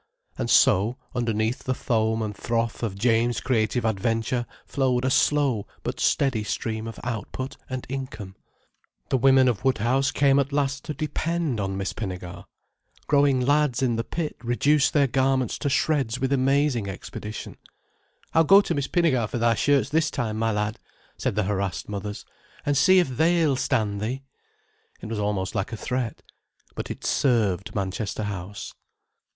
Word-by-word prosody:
And - - -3
so, 110 +7 +4 0.2
underneath 115 0 -1
the 130 - 0
foam 110 -2 0
and 105 -1 -4
froth 115 +1 -2
of 110 -5 -2
James' 115 +1 +2
creative 115 -1 0
adventure 115 +3 0 0.2
flowed 130 -2 0
a 130 - +1
slow 135 -8 +2 0.2
but - - -4
steady 130 -6 +1
stream 110 +2 -3
of 115 - -8
output 120 +3 -4
and 130 -1 -4
income. 130 -8 -6 0.7
The 130 - +2
women 130 0 +5
of 120 -3 0
Woodhouse 130 +1 +2
came 140 -1 +3
at 140 0 0
last 140 -1 -1
to 150 - -4
depend 155 -2 -2
on 95 -1 -2
Miss 95 0 -3
Pinnegar. 90 -4 -6 0.6
Growing 140 -3 +3
lads 145 -1 +2
in 120 -3 +2
the 115 - -1
pit 160 +4 -4
reduce 140 +5 +2
their 145 -2 +3
garments 130 -1 +1
to 145 - -1
shreds 135 -4 +1
with 135 +1 0
amazing 135 -4 +2
expedition. 105 +2 -7 0.8
"I'll 165 - +5
go 195 +5 +7
to 175 - -2
Miss 140 -3 -1
Pinnegar 145 -11 +2
for - - -3
thy 115 0 +3
shirts 140 +3 +2
this 155 +2 +2
time, 115 -5 -2
my 115 0 +1
lad," 105 0 -2 0.4
said - - -2
the 105 - +1
harassed 95 -2 -2
mothers, 105 0 -5 0.4
"and 145 - +1
see 185 +7 +5
if 180 - +4
they'll 160 -2 +3
stand 105 -5 0
thee." 130 +5 -3 0.8
It - - -9
was 110 -2 -3
almost 100 -3 -1
like 100 +1 -2
a 115 - -4
threat. 125 0 -3 0.5
But - - -5
it - - -7
served 105 -8 +1
Manchester 100 +2 -2
House. 100 -1 -6
120 Hz, 160 wpm, -25 LUFS, 110-135 Hz, 0.8 s, go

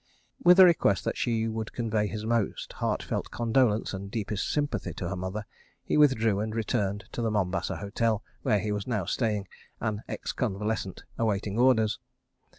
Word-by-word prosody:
With 180 -1 +7
a 190 - +12
request 155 - +3
that - - -1
she 115 -2 0
would 110 -1 -4
convey 110 -3 0
his 110 +1 -5
most 115 -2 -1
heart - - -1
felt - - -3
condolence 115 -3 +1
and 100 0 -5
deepest 105 -2 -2
sympathy 145 -3 -1
to 90 - -4
her - - -3
mother, 95 +4 -4 0.4
he - - -1
withdrew 115 -9 +4
and 110 +1 -2
returned 105 -3 -1
to - - -4
the 115 - +1
Mombasa 95 -3 -1
Hotel, 105 +3 0 0.2
where 110 -6 +2
he 105 +1 -2
was 105 -1 -3
now 105 -7 -1
staying, 105 -1 -1 0.3
an 110 -2 -2
ex - - -3
convalescent 105 -4 -2 0.2
awaiting 105 -1 0
orders. 120 -3 +4
110 Hz, 170 wpm, -28 LUFS, 100-115 Hz, 0.4 s, a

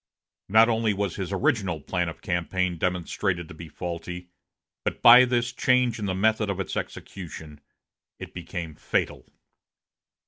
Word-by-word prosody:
Not 110 +3 +6
alone 110 -3 +1
was 100 -3 -1
his 95 -1 -4
original 95 -3 0
plan 90 +3 -2
of 80 - -11
campaign 90 0 -1
demonstrated 90 0 -1
to - - -10
be 80 +1 -10
faulty, 90 +1 -6 0.5
but - - -3
by 120 +2 +10
this 120 -1 0
change 125 -2 +2
in 105 - -2
the 95 - -1
method 110 +1 +2
of 100 -1 -2
its 95 - -3
execution 80 -5 -7 0.6
it - - -9
became 85 -2 -6
fatal. - - -2
95 Hz, 145 wpm, -26 LUFS, 85-110 Hz, 0.6 s, by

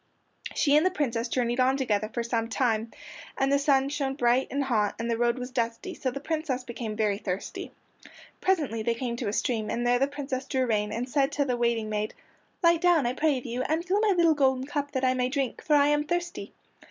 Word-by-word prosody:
She 285 -2 +3
and 305 - +5
the 370 - +4
Princess 250 -9 -1
journeyed 240 0 -1
on 260 +1 +3
together 215 -5 0
for 235 - -2
some 230 -1 -1
time, 225 -2 0 0.5
and 270 0 +1
the 280 - +4
sun 275 -1 +3
shone 275 -2 -2
bright 245 -1 +2
and 280 +1 -1
hot 215 -6 +1
and 230 +1 -2
the - - +2
road 235 +1 +1
was 250 0 -6
dusty, 235 +9 -2
so 270 - -2
the 265 +2 -5
Princess 305 -4 -2
became 235 -3 -5
very 210 -2 0
thirsty. 190 -2 -5 0.7
Presently 295 -12 +1
they 230 +1 0
came 240 -1 -3
to 235 - -3
a - - 0
stream, 220 -2 -1
and 240 - -1
there 245 0 +3
the 275 - +3
Princess 275 -2 -4
drew 260 -1 +1
rein, 210 -3 0
and 235 +3 -3
said 275 +1 +1
to 285 - +1
the 250 -2 0
waiting 235 -2 0
maid, 215 0 -2 0.5
"Light 335 -1 +4
down, 350 -6 +4
I 240 - 0
pray 295 0 +1
of 250 - -7
you, 245 +1 -3
and 315 +6 -1
fill 380 +3 +1
my 420 -3 +3
little 335 -2 +5
golden 265 -3 +2
cup 285 0 -3
that 260 -1 0
I 255 - +3
may 250 0 0
drink, 270 -2 -2
for 300 - +3
I 285 0 +5
am 295 0 +2
thirsty." 350 +2 -3
255 Hz, 235 wpm, -27 LUFS, 235-285 Hz, 0.7 s, and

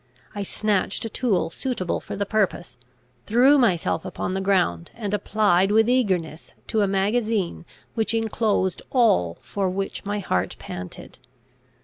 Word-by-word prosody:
I 205 - -4
snatched 205 +1 -1
a - - -3
tool 200 -9 0
suitable 235 -5 -2
for - - -7
the 200 - -1
purpose, 200 -4 -1 0.5
threw 260 +6 +5
myself 190 -10 +1
upon 185 - -4
the 190 - -1
ground, 180 - +1
and 210 -3 -4
applied 205 -3 +2
with 220 +1 +4
eagerness 185 -11 0 0.2
to 220 - +2
a 200 - +3
magazine 200 -2 0 0.3
which 225 0 0
inclosed 220 -4 0
all 210 - +3
for 195 -2 -2
which 195 +1 -3
my 205 +1 -2
heart 95 - -1
panted. 90 0 -8
200 Hz, 140 wpm, -24 LUFS, 185-225 Hz, 0.5 s, threw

